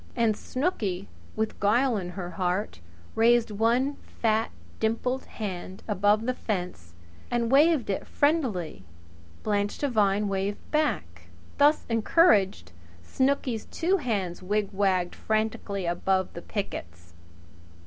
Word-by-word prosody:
And 230 Hz, -3 st, +2 dB
Snooky, 210 Hz, -, -2 dB, 0.3 s
with 220 Hz, 0 st, -2 dB
guile 235 Hz, +5 st, +3 dB
in 185 Hz, -4 st, -3 dB
her 175 Hz, -2 st, -4 dB
heart, 180 Hz, -, -2 dB, 0.3 s
raised 235 Hz, 0 st, +4 dB
one 240 Hz, +7 st, +1 dB, 0.2 s
fat, 220 Hz, 0 st, +2 dB, 0.3 s
dimpled 240 Hz, +4 st, -1 dB
hand 190 Hz, -3 st, -6 dB
above 210 Hz, +1 st, +2 dB
the 255 Hz, -, +1 dB
fence 180 Hz, -, -4 dB, 0.3 s
and 235 Hz, -1 st, 0 dB
waved 295 Hz, -2 st, +5 dB
it 195 Hz, -, -3 dB
friendlily. 245 Hz, -, 0 dB, 0.6 s
Blanche 205 Hz, -1 st, 0 dB
Devine 210 Hz, -6 st, +2 dB
waved 195 Hz, +1 st, -1 dB
back. 85 Hz, -, -1 dB, 0.3 s
Thus 295 Hz, +2 st, +4 dB
encouraged, 225 Hz, -, +3 dB, 0.3 s
Snooky's 260 Hz, -, 0 dB
two 365 Hz, +4 st, 0 dB
hands 200 Hz, -, -2 dB
wigwagged 195 Hz, -2 st, 0 dB
frantically 215 Hz, -3 st, -2 dB
above 185 Hz, +2 st, 0 dB
the 170 Hz, -, -7 dB
pickets. 85 Hz, -, -6 dB
210 Hz, 110 wpm, -27 LUFS, 190-240 Hz, 0.6 s, waved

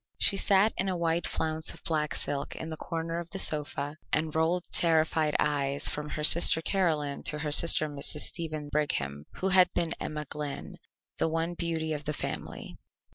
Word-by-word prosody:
She -, -, +4 dB
sat 195 Hz, +2 st, +4 dB
in 190 Hz, -, +1 dB
a 185 Hz, -, -2 dB
wide 165 Hz, 0 st, 0 dB
flounce 160 Hz, 0 st, -2 dB
of -, -, -16 dB
black 155 Hz, -2 st, -1 dB
silk 140 Hz, -1 st, -3 dB
in 160 Hz, -, -6 dB
the -, -, -4 dB
corner 165 Hz, +1 st, -4 dB
of 170 Hz, 0 st, -7 dB
the 195 Hz, -, -6 dB
sofa, 150 Hz, -3 st, -1 dB
and 155 Hz, 0 st, 0 dB
rolled 165 Hz, +3 st, 0 dB
terrified 160 Hz, -2 st, +2 dB
eyes 140 Hz, -1 st, 0 dB
from 150 Hz, 0 st, -5 dB
her 150 Hz, -, -4 dB
sister 160 Hz, +1 st, +8 dB
Caroline 160 Hz, -5 st, -1 dB
to 150 Hz, -, -1 dB
her 150 Hz, 0 st, -3 dB
sister 155 Hz, 0 st, +6 dB
Mrs. 145 Hz, +1 st, -5 dB
Stephen 155 Hz, -3 st, -6 dB
Brigham, 75 Hz, -, -2 dB
who 190 Hz, -, -2 dB
had 185 Hz, -1 st, +6 dB
been 165 Hz, -1 st, 0 dB
Emma 150 Hz, 0 st, -4 dB
Glynn, 145 Hz, 0 st, -6 dB, 0.4 s
the -, -, +1 dB
one 165 Hz, +2 st, -2 dB
beauty 165 Hz, -2 st, -3 dB
of 150 Hz, -1 st, -6 dB
the 150 Hz, -, -1 dB
family. -, -, -6 dB
160 Hz, 185 wpm, -28 LUFS, 150-170 Hz, 0.4 s, sister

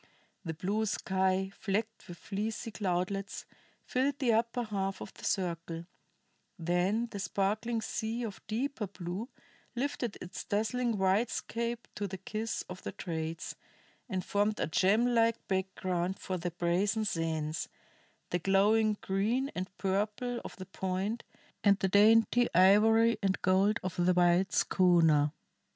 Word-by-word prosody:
The 165 Hz, -3 st, -4 dB
blue 205 Hz, +6 st, -1 dB
sky, 190 Hz, 0 st, 0 dB
flecked 215 Hz, +3 st, -3 dB
with 175 Hz, -, -9 dB
fleecy 215 Hz, +4 st, -4 dB
cloudlets, 195 Hz, 0 st, -2 dB, 0.4 s
filled 270 Hz, +2 st, 0 dB
the 255 Hz, -6 st, +2 dB
upper 235 Hz, +2 st, +1 dB
half 195 Hz, -3 st, -2 dB
of -, -, -8 dB
the -, -, -15 dB
circle; 170 Hz, -2 st, -2 dB, 0.7 s
then 180 Hz, +7 st, +1 dB
the 200 Hz, -, -5 dB
sparkling 215 Hz, +4 st, -1 dB
sea 225 Hz, +2 st, -3 dB
of 210 Hz, -4 st, -6 dB
deeper 235 Hz, 0 st, -2 dB
blue 185 Hz, +5 st, -5 dB, 0.5 s
lifted 250 Hz, -3 st, -2 dB
its 180 Hz, -, -7 dB
dazzling 230 Hz, +3 st, 0 dB
whitecaps 230 Hz, +4 st, 0 dB
to 205 Hz, -, -3 dB
the 190 Hz, 0 st, -6 dB
kiss 215 Hz, +4 st, -3 dB
of 180 Hz, 0 st, -9 dB
the -, -, -6 dB
trades 165 Hz, -1 st, -4 dB, 0.5 s
and 185 Hz, -1 st, -2 dB
formed 205 Hz, +1 st, +1 dB
a -, -, +1 dB
gem 195 Hz, +8 st, +3 dB
like 230 Hz, -2 st, +2 dB
background 185 Hz, -1 st, -1 dB
for 190 Hz, -, -4 dB
the 175 Hz, +1 st, -2 dB
brazen 180 Hz, +6 st, 0 dB
sands, 160 Hz, -4 st, -2 dB, 0.6 s
the 175 Hz, -, +1 dB
glowing 210 Hz, +4 st, +3 dB
green 225 Hz, +8 st, 0 dB
and 185 Hz, +1 st, -4 dB
purple 215 Hz, +5 st, -1 dB
of -, -, -8 dB
the 185 Hz, -, -8 dB
Point, 190 Hz, +4 st, -3 dB, 0.4 s
and 200 Hz, -1 st, +5 dB
the 190 Hz, -, +1 dB
dainty 225 Hz, +4 st, +5 dB
ivory 220 Hz, +5 st, +5 dB
and 195 Hz, -1 st, +1 dB
gold 195 Hz, +3 st, +3 dB
of 180 Hz, -1 st, -1 dB
the 180 Hz, +1 st, +4 dB
white 180 Hz, +2 st, +4 dB
schooner. 165 Hz, -5 st, +4 dB
195 Hz, 135 wpm, -31 LUFS, 185-225 Hz, 0.7 s, and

